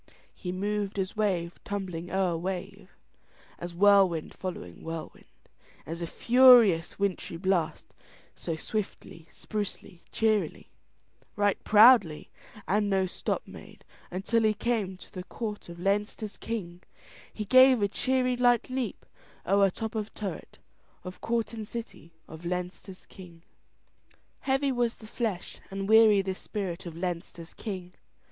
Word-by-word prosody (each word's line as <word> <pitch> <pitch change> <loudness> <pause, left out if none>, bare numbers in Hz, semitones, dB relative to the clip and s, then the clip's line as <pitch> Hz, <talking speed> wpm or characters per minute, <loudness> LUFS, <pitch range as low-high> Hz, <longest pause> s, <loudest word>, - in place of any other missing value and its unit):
He 180 - -5
moved 205 +2 -2
as 190 +1 -2
wave 180 -5 -1
tumbling 180 -4 -4
o'er 185 -3 +1
wave 190 +3 -5 0.7
As 175 0 -7
whirlwind 190 -4 +4
following 175 - -7
whirlwind, 165 -1 -7 0.6
As 165 +2 -6
a 170 - -2
furious 235 -8 +6
wintry 195 -4 -2
blast, 180 -3 0 0.5
So 165 - -4
swiftly, 170 -3 -5
sprucely, 205 -4 -6
cheerily, 220 -2 0 0.7
Right 205 -1 +1
proudly, 210 -7 +6 0.4
And 205 +1 +1
no 190 -1 +2
stop 185 - -3
made - - -13 0.2
Until 195 +6 0
he 215 -1 +2
came 210 -4 -1
To - - -15
the 185 - -6
court 210 -2 -6
of 170 0 -9
Leinster's 205 +2 -1
King, 180 -6 -5 0.5
He 210 - -5
gave 255 0 +6
a - - +4
cheery 255 +4 +1
light 245 0 +2
leap 255 -5 -3 0.4
O'er 195 +1 +4
top 220 +4 -5
of 215 -1 -3
turret, 205 -3 -6 0.5
Of 180 0 -9
court 230 -1 -1
and 220 -2 -6
city 225 -8 -8 0.2
Of 160 +2 -11
Leinster's 180 +2 -5
King. 170 -3 -14 1.0
Heavy 270 +1 +1
was 240 -2 0
the 220 - -14
flesh 215 -4 -4
and 195 0 -4
weary 215 -2 +6
the 190 0 -2
spirit 190 -2 -5
of 165 -1 -8
Leinster's 170 -1 -5
king. 185 -4 -6
195 Hz, 135 wpm, -28 LUFS, 180-220 Hz, 1.0 s, furious